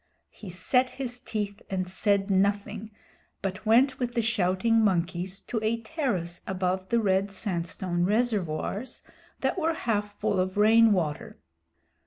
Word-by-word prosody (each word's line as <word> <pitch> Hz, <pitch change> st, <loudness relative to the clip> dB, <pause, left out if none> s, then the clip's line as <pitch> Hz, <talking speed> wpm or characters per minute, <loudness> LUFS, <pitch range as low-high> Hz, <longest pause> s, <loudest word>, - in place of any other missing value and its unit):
He 205 Hz, -, -10 dB
set 250 Hz, +9 st, +1 dB
his 250 Hz, -2 st, -5 dB
teeth 210 Hz, -4 st, -4 dB
and 185 Hz, -1 st, -2 dB
said 200 Hz, +1 st, +1 dB
nothing, 200 Hz, +2 st, 0 dB, 0.5 s
but 195 Hz, +2 st, -4 dB
went 260 Hz, +4 st, +4 dB
with 245 Hz, -1 st, -2 dB
the 235 Hz, -, +2 dB
shouting 225 Hz, +1 st, +2 dB
monkeys 185 Hz, -1 st, 0 dB
to 230 Hz, -, -3 dB
a 220 Hz, +1 st, +1 dB
terrace 220 Hz, -, -3 dB
above 185 Hz, 0 st, -1 dB
the 235 Hz, -, +3 dB
red 195 Hz, -1 st, +1 dB
sandstone 175 Hz, -2 st, -2 dB
reservoirs 210 Hz, +1 st, -1 dB, 0.4 s
that -, -, 0 dB
were 325 Hz, 0 st, +1 dB
half 210 Hz, -7 st, -1 dB
full 205 Hz, -3 st, +1 dB
of 185 Hz, +1 st, -1 dB
rain 225 Hz, +2 st, +6 dB
water. 160 Hz, -7 st, -1 dB
205 Hz, 140 wpm, -27 LUFS, 185-230 Hz, 0.5 s, rain